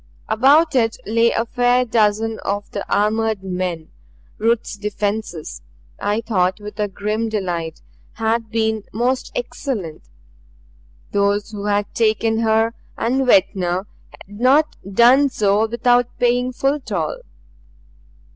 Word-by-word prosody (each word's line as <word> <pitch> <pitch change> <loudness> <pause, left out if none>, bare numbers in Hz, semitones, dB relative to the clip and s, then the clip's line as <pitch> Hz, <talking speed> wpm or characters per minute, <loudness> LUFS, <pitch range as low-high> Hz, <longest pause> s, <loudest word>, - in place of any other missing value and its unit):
About 285 +8 +4
it 225 -4 +1
lay 230 +2 +3
a 230 - 0
fair 245 +1 +2
dozen 220 -1 +1
of 205 +1 -4
the 200 - -4
armored 215 -1 +1
men. 180 -4 -3 0.5
Ruth's 230 0 0
defense, 205 -4 -4 0.4
I 205 +2 0
thought 185 -5 0
with 210 0 -9
a 210 - +1
grim 210 +3 -2
delight, 175 -6 -3 0.3
had 225 0 -1
been 220 -1 0
most 250 +3 -1
excellent 225 - -4 1.1
those 205 +1 0
who 205 -1 -6
had 205 0 0
taken 225 0 +1
her 225 0 +2 0.2
and 260 +3 0
Ventnor 190 -3 +2 0.2
had 205 +2 -14
not 280 +5 +3 0.2
done 250 +7 +5
so 210 -2 +1
without 245 +1 +2
paying 245 +1 +1
full 275 +3 0
toll. - - -3
220 Hz, 120 wpm, -20 LUFS, 205-240 Hz, 1.1 s, done